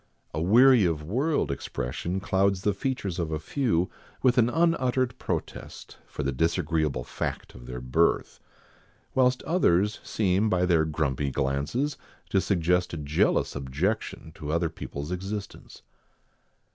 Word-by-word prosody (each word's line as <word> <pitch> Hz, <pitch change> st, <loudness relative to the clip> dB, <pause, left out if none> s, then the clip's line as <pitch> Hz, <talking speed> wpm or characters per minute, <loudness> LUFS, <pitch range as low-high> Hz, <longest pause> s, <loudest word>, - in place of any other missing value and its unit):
A 80 Hz, -, -2 dB
weary 120 Hz, +6 st, +6 dB
of 80 Hz, -4 st, 0 dB
world 130 Hz, -, 0 dB
expression 70 Hz, +7 st, -3 dB
clouds 95 Hz, 0 st, +1 dB
the 105 Hz, -, +2 dB
features 100 Hz, -5 st, -3 dB
of 80 Hz, -2 st, -2 dB
a 80 Hz, -, 0 dB
few 90 Hz, -, 0 dB, 0.4 s
with 125 Hz, -1 st, +4 dB
an 115 Hz, 0 st, +4 dB
unuttered 130 Hz, -6 st, +1 dB
protest, -, -, -5 dB
for -, -, -5 dB
the 70 Hz, -, 0 dB
disagreeable 80 Hz, -1 st, 0 dB
fact -, -, -5 dB
of -, -, -12 dB
their 60 Hz, 0 st, -5 dB
birth, 65 Hz, +7 st, +1 dB, 0.7 s
whilst 125 Hz, -1 st, +2 dB
others 105 Hz, -, +2 dB
seem 100 Hz, +1 st, +1 dB
by 90 Hz, -2 st, +2 dB
their 85 Hz, -3 st, +3 dB
grumpy 75 Hz, -3 st, -1 dB
glances 70 Hz, -, -1 dB, 0.3 s
to 95 Hz, -, +3 dB
suggest 90 Hz, -2 st, +1 dB
a -, -, -4 dB
jealous 75 Hz, +1 st, +1 dB
objection 75 Hz, +6 st, -2 dB
to 75 Hz, -1 st, -6 dB
other 85 Hz, +1 st, +1 dB
people's 75 Hz, -1 st, -6 dB
existence. 100 Hz, +3 st, -6 dB
90 Hz, 135 wpm, -27 LUFS, 75-110 Hz, 0.7 s, weary